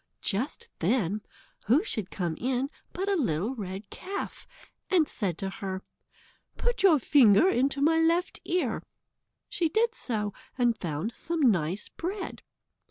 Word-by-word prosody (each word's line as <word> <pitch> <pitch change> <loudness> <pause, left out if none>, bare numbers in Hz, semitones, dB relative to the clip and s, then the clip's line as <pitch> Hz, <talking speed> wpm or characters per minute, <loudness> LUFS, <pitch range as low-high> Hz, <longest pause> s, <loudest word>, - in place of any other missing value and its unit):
Just 220 +8 -1
then, 210 +1 +1 0.5
who 265 - +5
should 215 - -4
come 175 -4 -2
in 260 +2 0 0.2
but 385 +2 -3
a 400 - +2
little 220 - 0
red 200 -3 -6
calf, 395 +2 -6 0.4
and 340 -5 +4
said 185 -6 -2
to 195 0 -3
her: 190 -2 -5 0.7
"Put 485 0 -1
your 365 -6 +7
finger 250 - +6
into 275 -4 +2
my 325 +2 +4
left 335 +2 +2
ear." 325 -11 0 0.7
She 335 -2 0
did 455 +6 +2
so, 210 - -2 0.2
and 240 -2 +3
found 175 +3 -3
some 335 -1 -3
nice 190 - +2
bread. 375 +4 -5
245 Hz, 140 wpm, -28 LUFS, 200-330 Hz, 0.7 s, your